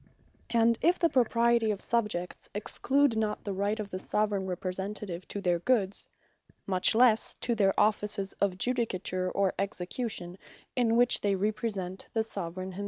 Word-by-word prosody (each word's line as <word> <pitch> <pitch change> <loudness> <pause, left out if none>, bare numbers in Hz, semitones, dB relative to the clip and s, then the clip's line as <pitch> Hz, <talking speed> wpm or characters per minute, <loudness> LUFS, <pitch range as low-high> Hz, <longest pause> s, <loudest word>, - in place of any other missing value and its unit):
And 230 0 +3
if 350 +2 +3
the 335 - +2
Propriety 235 -2 +3
of 205 -2 -1
Subjects, 210 -7 -2
exclude 265 +5 +1
not 215 -1 -1
the 200 - -3
Right 200 +3 -1
of 205 -2 -5
the 185 - -4
Soveraign 205 -1 -1
Representative 185 0 -4
to 200 - -4
their 175 -3 +1
Goods; 200 -2 +1 0.6
much 185 +2 +3
lesse 230 -2 +4
to 240 - 0
their 195 -3 +2
offices 210 -1 +1
of 195 -2 +1
Judicature, 185 -6 -1
or 195 -2 +1
Execution, 190 -1 -4 0.4
in 230 -2 +2
which 245 +1 +5
they 200 -1 +1
Represent 200 -2 -3
the 225 - +1
Soveraign 185 -3 -5
himselfe. 185 - -9
205 Hz, 155 wpm, -29 LUFS, 190-230 Hz, 0.6 s, which